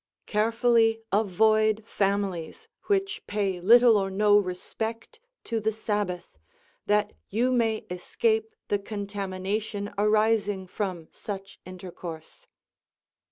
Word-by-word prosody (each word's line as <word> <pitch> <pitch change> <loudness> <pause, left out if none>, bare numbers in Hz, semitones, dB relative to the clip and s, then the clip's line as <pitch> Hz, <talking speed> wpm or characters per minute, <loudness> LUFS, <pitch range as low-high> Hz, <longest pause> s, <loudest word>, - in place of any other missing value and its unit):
Carefully 225 +1 +2
avoid 215 +2 +3
families 195 -6 -2 0.2
which 400 0 0
pay 200 -3 -1
little 230 +4 +7
or 195 -1 -1
no 205 +2 +4
respect 210 +4 -2 0.2
to 230 - -2
the 220 +1 0
Sabbath, 205 - -3 0.5
that 210 0 +2 0.2
you 240 +5 +1
may 225 -3 +1
escape 440 - -1
the 205 - +1
contamination 200 0 -4
arising 210 -2 +2
from 185 -3 -4
such 195 -1 -7
intercourse. 175 -3 -9
210 Hz, 100 wpm, -27 LUFS, 195-225 Hz, 0.5 s, little